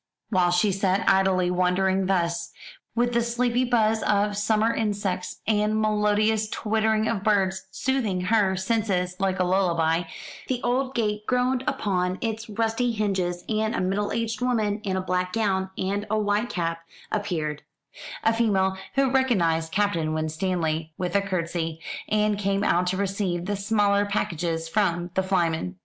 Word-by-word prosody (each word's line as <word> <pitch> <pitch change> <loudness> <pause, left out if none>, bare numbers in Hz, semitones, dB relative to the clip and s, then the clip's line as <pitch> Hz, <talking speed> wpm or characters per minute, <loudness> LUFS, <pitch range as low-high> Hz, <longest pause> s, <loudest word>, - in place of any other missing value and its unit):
While 180 -3 +3
she 180 +4 +2
sat 195 0 0
idly 185 -2 +3
wondering 185 +1 +1
thus, 170 -2 0 0.4
with 240 +1 +1
the 235 - +3
sleepy 240 +1 +1
buzz 225 -3 +2
of 205 0 +1
summer 215 +2 +2
insects 205 -5 -2
and 215 0 +1
melodious 215 0 +2
twittering 220 0 0
of 210 -4 -1
birds 195 -3 +1
soothing 215 -4 -1
her 195 0 +2
senses 190 -3 0
like 190 -1 0
a - - +3
lullaby, 175 -3 +1 0.4
the 255 -2 -1
old 260 +2 0
gate 210 -2 -1
groaned 250 0 +1
upon 185 -7 0
its 225 0 -3
rusty 225 +3 0
hinges, 185 -5 -1
and 220 +1 0
a - - -1
middle 195 +3 -1
aged 230 0 -2
woman 220 -4 0
in 190 -2 -1
a - - 0
black 180 0 -1
gown 195 -4 0
and 200 +2 -2
a 215 - +1
white 210 +2 0
cap 165 -1 -2 0.3
appeared 160 -8 -2 0.6
a 225 - +3
female 195 -4 +1 0.2
who 270 -1 +3
recognised 170 -12 +2
Captain 170 -6 0
Winstanley 160 0 -2
with 180 0 -3
a 200 - +4
curtsey, 170 -4 -3 0.3
and 210 -1 +1
came 200 0 0
out 180 -2 +2
to 185 +1 0
receive 190 -3 -1
the 205 +1 -1
smaller 205 0 +2
packages 165 -4 -2
from 175 -2 0
the 190 - +2
flyman. 170 - 0
200 Hz, 155 wpm, -25 LUFS, 180-220 Hz, 0.6 s, a